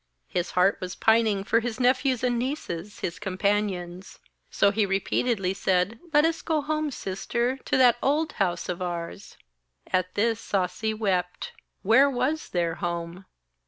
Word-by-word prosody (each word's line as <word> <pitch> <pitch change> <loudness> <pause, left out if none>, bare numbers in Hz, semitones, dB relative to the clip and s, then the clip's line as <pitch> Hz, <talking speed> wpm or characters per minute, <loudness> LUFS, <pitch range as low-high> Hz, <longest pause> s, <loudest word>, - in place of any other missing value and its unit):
His 175 0 -1
heart 190 +2 +4
was 180 0 -5
pining 220 -3 +3
for 230 +3 +2
his 235 0 -4
nephews 255 0 +2
and 245 -1 +1
nieces, 210 - -4
his 170 - -3
companions. 190 -2 -2 0.3
So 200 - +3
he 215 +1 +1
repeatedly 195 +1 0
said: 190 +3 0
'Let 295 +1 +5
us 325 0 0
go 315 -2 0
home, 305 0 -1
sister, 235 +3 -2
to - - +1
that 245 -2 +5
old 300 +4 +1
house 175 -3 0
of 180 0 -4
ours.' 175 +2 -5 0.5
At 185 0 -1
this 225 +2 +1
Sasi 195 +3 -1
wept. 185 -4 -1 0.3
Where 255 +8 +5
was 275 +4 -1
their 170 -2 0
home? 170 +1 -4
205 Hz, 150 wpm, -26 LUFS, 180-245 Hz, 0.5 s, Let